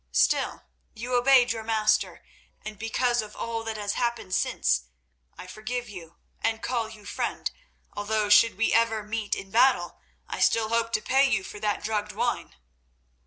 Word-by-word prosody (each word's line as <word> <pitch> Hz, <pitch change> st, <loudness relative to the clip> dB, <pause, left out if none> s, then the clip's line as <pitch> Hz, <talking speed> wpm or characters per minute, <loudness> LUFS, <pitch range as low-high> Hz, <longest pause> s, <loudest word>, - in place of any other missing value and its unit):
Still, -, -, +2 dB, 0.3 s
you 240 Hz, +3 st, -5 dB
obeyed 250 Hz, 0 st, +5 dB
your 225 Hz, -1 st, -3 dB
master, 215 Hz, -1 st, +1 dB, 0.4 s
and 215 Hz, -1 st, -7 dB
because 240 Hz, +2 st, +1 dB
of 210 Hz, -1 st, -10 dB
all 230 Hz, -1 st, -4 dB
that 220 Hz, -1 st, -4 dB
has 205 Hz, -1 st, -2 dB
happened 235 Hz, -6 st, -2 dB
since, 65 Hz, -, +1 dB, 0.5 s
I -, -, -9 dB
forgive 225 Hz, +6 st, -5 dB
you, 170 Hz, -4 st, -10 dB, 0.3 s
and 225 Hz, 0 st, -1 dB
call 235 Hz, -3 st, -1 dB
you 215 Hz, -2 st, -13 dB
friend, -, -, -3 dB, 0.4 s
although 210 Hz, +1 st, -1 dB
should 210 Hz, 0 st, +5 dB
we 225 Hz, -, +1 dB
ever 225 Hz, -1 st, +2 dB
meet 215 Hz, 0 st, -2 dB
in 195 Hz, -, -8 dB
battle 240 Hz, -6 st, +3 dB, 0.3 s
I -, -, -5 dB
still 220 Hz, -1 st, +3 dB
hope 230 Hz, 0 st, 0 dB
to 215 Hz, -, 0 dB
pay 270 Hz, +1 st, +3 dB
you 195 Hz, -, +1 dB
for 210 Hz, -, -9 dB
that 210 Hz, -1 st, -1 dB
drugged 210 Hz, -1 st, -2 dB
wine." -, -, -2 dB
220 Hz, 165 wpm, -26 LUFS, 210-230 Hz, 0.5 s, obeyed